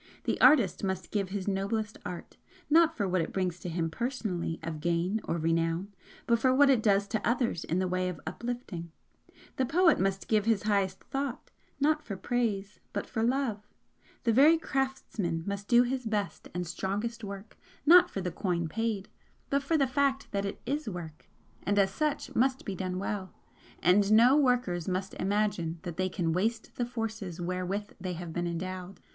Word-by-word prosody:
The - - -1
artist 240 - +5
must 190 -1 -2
give 200 -3 -1
his 195 0 -4
noblest 205 +2 -1
art, 175 - -7 0.4
not 330 +1 +5
for 205 -3 0
what 185 -1 +1
it 160 - -3
brings 180 -2 -1
to 180 - -5
him 165 -1 -1
personally 210 -7 -2
of 160 -2 -5
gain 175 +6 0
or 170 - -1
renown, 165 +4 0 0.3
but 235 -1 +3
for 260 +2 +3
what 280 0 +6
it 250 -4 +3
does 200 -2 +3
to 220 -1 -1
others 235 -7 0
in 170 - -1
the 185 0 +1
way 185 0 0
of 170 -4 -6
uplifting; 235 -9 -5 0.7
the 260 - +2
poet 345 +1 +4
must 195 0 0
give 215 -2 +2
his 225 -3 +2
highest 200 -3 0
thought, 270 -2 -4 0.3
not 300 +2 +2
for 200 -4 -5
praise, 210 -2 -1
but 205 - -2
for 225 - -3
love; 230 -4 0 0.6
the 230 - +3
very 295 +7 +7
craftsman 265 - -2
must 200 0 -4
do 240 0 +6
his 255 +1 -2
best 210 -2 -2
and 180 0 -3
strongest 205 +7 -3
work 200 +1 -7 0.3
not 350 +3 +8
for 195 - -4
the 180 -1 -2
coin 170 -4 -1
paid, 215 +2 -2 0.4
but 280 0 +3
for 315 +4 +1
the 275 - +3
fact 275 +1 0
that 200 0 -1
it 200 - -4
is 285 0 -2
work, 165 -5 -8 0.3
and 205 0 0
as 195 -1 +4
such 300 +6 -2
must 260 +2 +1
be 200 - -3
done 185 -1 -3
well 190 -1 -4 0.5
and 195 +3 +4
none 245 +7 +7 0.5
must 190 +1 -2
imagine 195 -4 0
that 175 -3 -6
they 185 0 +1
can 170 -3 -1
waste 220 +6 -1
the 245 - 0
forces 220 -7 -4
wherewith 185 +4 -3
they 185 -1 -3
have 170 -1 -6
been 175 0 -1
endowed. 185 +2 -5
200 Hz, 185 wpm, -30 LUFS, 180-240 Hz, 0.7 s, not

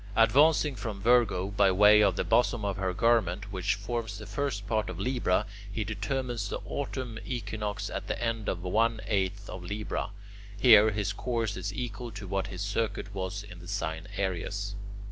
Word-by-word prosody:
Advancing 145 +6 +5
from 105 -3 -5
Virgo 110 -4 +3
by 100 -1 +4
way 105 +3 +7
of 100 -3 +4
the - - 0
bosom 120 -3 +2
of 100 -1 -1
her 95 -1 0
garment, 100 -2 +1
which 95 0 0
forms 110 +2 -4
the 105 - -8
first 105 -1 -2
part 110 0 0
of - - -6
Libra, 125 -7 +1 0.3
he 110 +1 -2
determines 110 +1 -2
the - - -2
autumn 130 -5 -4
equinox 105 -4 -3
at - - -5
the - - -2
end 115 -2 -1
of 90 -1 -3
one 110 +5 +2
eighth 100 0 -1
of 95 - -7
Libra. 105 +2 -3 0.5
Here 110 -2 +8
his 105 -1 -1
course 115 -2 -2
is 100 - -3
equal 120 +2 -5
to 100 -1 -7
what 95 0 -1
his 95 0 -5
circuit 105 0 -2
was 95 +1 -4
in 100 -4 -11
the 85 - -11
sign 80 -4 -3
Aries. 100 +2 -2
105 Hz, 180 wpm, -29 LUFS, 95-115 Hz, 0.5 s, Here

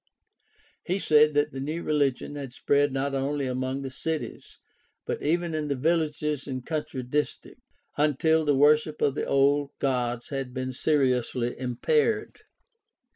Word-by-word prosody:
He 185 +2 -1
said 150 -4 +4
that 145 +1 +2
the 135 - -6
new 155 +5 -3
religion 145 -2 0
had 140 -4 -7
spread 145 +2 +2
not 135 +1 -1
only 140 +1 -1
among 130 +1 -2
the 135 - -5
cities, 160 +4 -5 0.5
but - - -3
even 170 +2 0
in 155 -1 -2
the 140 - 0
villages 150 -1 0
and 130 -2 -5
country 150 -4 -3
districts, 145 +4 -3 0.4
until 155 +2 +3
the 145 -2 +2
worship 150 +2 +4
of 140 - +2
the - - -3
old 140 +1 +3
gods 125 -3 -1
had 135 -2 -4
been 130 0 -3
seriously 125 -4 +1
impaired. 130 - 0
145 Hz, 145 wpm, -27 LUFS, 130-150 Hz, 0.5 s, said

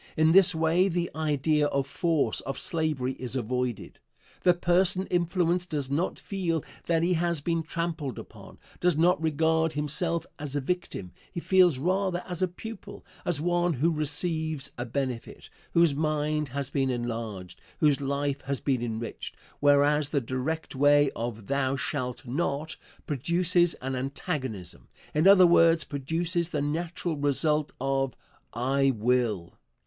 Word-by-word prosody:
In 155 +1 +5
this 180 -1 +6
way 165 +4 +3
the 175 -1 -1
idea 150 -1 +1
of 140 -1 0
force, 160 +1 0
of 135 - -5
slavery, 155 -7 -1
is 125 0 -4
avoided. 125 -1 -3 0.4
The 180 -1 +4
person 180 +2 +2
influenced 175 0 +1
does 145 -4 -2
not 165 +6 0
feel 175 -6 -2 0.2
that 165 -1 +2
he 180 +2 +2
has 170 -1 0
been 165 +3 -1
trampled 160 -4 -3
upon, - - -11 0.2
does 175 -3 +2
not 170 0 +3
regard 160 +1 +1
himself 155 +3 -1
as 145 -1 -5
a - - +2
victim 140 - -3 0.2
he - - -4
feels 180 -4 +4
rather 185 +4 0
as 180 -1 -4
a 185 - +3
pupil, 200 +2 -9 0.2
as 175 -5 +1
one 175 +1 +1
who 155 +5 +1
receives 155 0 -1
a 120 - -4
benefit, 125 -2 -4 0.2
whose 170 -3 +4
mind 150 0 0
has 140 +1 -4
been 135 -2 +1
enlarged, 115 -7 -4 0.2
whose 150 -2 +3
life 140 0 -1
has 140 0 -3
been 130 -4 0
enriched 115 -1 -5 0.2
whereas 145 +1 +4
the 145 - +1
direct 130 +6 -3
way 145 +1 +4
of 115 -2 -5
"Thou 135 +1 0
shalt 130 -2 -3
not" 145 +3 -2 0.3
produces 175 +4 +1
an 130 0 -2
antagonism 130 - -4 0.3
in 155 +5 +3
other 195 -2 +8
words, 165 -1 +5
produces 165 +4 -2
the 155 - -2
natural 165 +3 -2
result 150 +1 +1
of 135 -1 0 0.4
"I 135 +3 +1
will." 110 -6 0
150 Hz, 145 wpm, -27 LUFS, 135-170 Hz, 0.4 s, other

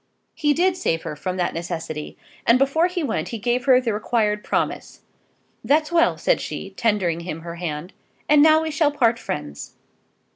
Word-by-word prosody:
He 295 -1 +1
did 360 +1 +2
save 165 - -1
her - - -5
from 185 +4 -4
that 180 - -1
necessity, 165 -3 -5 0.3
and 235 - +6
before 275 +6 +2
he 360 -2 -3
went 285 - -2
he 235 - -5
gave 240 +3 -1
her 260 -2 +6
the 235 -4 -1
required 210 -1 0
promise. - - -2 0.6
"That's 305 +3 +2
well," 335 -1 +3
said - - +1
she, - - -6
tendering 195 -7 0
him 170 -2 -6
her 170 0 -8
hand; 170 0 -5 0.3
"and 295 0 +6
now 315 +1 +6
we 320 - -3
shall 305 -1 +2
part 235 -5 +2
friends." 150 - -6
230 Hz, 180 wpm, -22 LUFS, -, 0.6 s, and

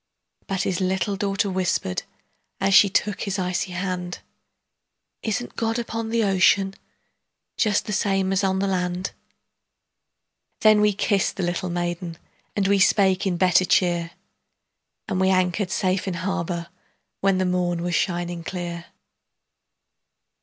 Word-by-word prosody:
But 195 -1 -1
his 185 -1 -1
little 190 +2 0
daughter 195 0 0
whispered, 185 - -1 0.6
As 195 0 +2
she 200 +1 +7
took 205 +1 0
his 200 -1 -2
icy 180 0 -2
hand, 180 -1 -3 1.0
"Isn't 230 +2 -3
God 225 0 -1
upon 230 -1 -3
the 230 0 +1
ocean, 195 0 +3 0.8
Just 210 -3 +1
the 210 - -3
same 195 -1 +1
as 195 +1 +1
on 190 -1 +1
the 195 - 0
land?" 180 0 -1 1.5
Then 215 -1 +6
we 210 0 +4
kissed 200 0 0
the 190 - -3
little 175 +1 -2
maiden, 175 -1 -3 0.4
And 200 -2 +1
we 200 0 +3
spake 190 -1 +3
in 180 -2 0
better 185 0 +4
cheer, 175 -2 +2 1.0
And 190 -3 -1
we 190 - +3
anchored 185 +1 +1
safe 185 +1 0
in 185 - -2
harbor 175 -2 -3 0.5
When 195 -1 +2
the 185 - +1
morn 175 -1 0
was 175 0 -2
shining 175 -1 -1
clear. 170 -1 -5
190 Hz, 140 wpm, -24 LUFS, 175-195 Hz, 1.5 s, she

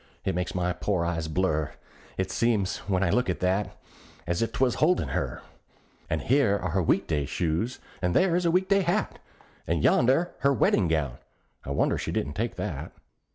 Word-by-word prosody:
it - - +1
makes 90 +2 -3
my 90 0 0
poor 90 -1 -1
eyes 80 -2 -2
blur; 80 -3 0 0.5
It 95 - -1
seems, 110 -5 +1
when 95 -1 +2
I 90 - +2
look 125 -1 +1
at 90 - -1
that, 95 +1 0 0.5
as 85 +3 -1
if 115 - 0
'twas 125 0 +1
holdin' 175 +4 +3
her. - - -3 0.7
And - - -1
here 125 -6 +3
are 90 -3 -3
her 95 +3 +1
week 80 - +2
day 75 -4 -1
shoes, 85 - -1 0.2
and 90 -1 0
there 185 -2 +4
is 180 0 +1
her - - +4
week 185 +3 +2
day 195 0 +4
hat, 185 +4 -1 0.5
And - - 0
yonder's 135 +9 +4
her 140 0 +3
weddin' 100 -4 +3
gown: 75 -6 -1 0.4
I - - -8
wonder 70 - +1
she - - -3
didn't 75 - -2
take 115 +6 -2
that. 80 -6 -5
95 Hz, 195 wpm, -27 LUFS, 85-125 Hz, 0.7 s, there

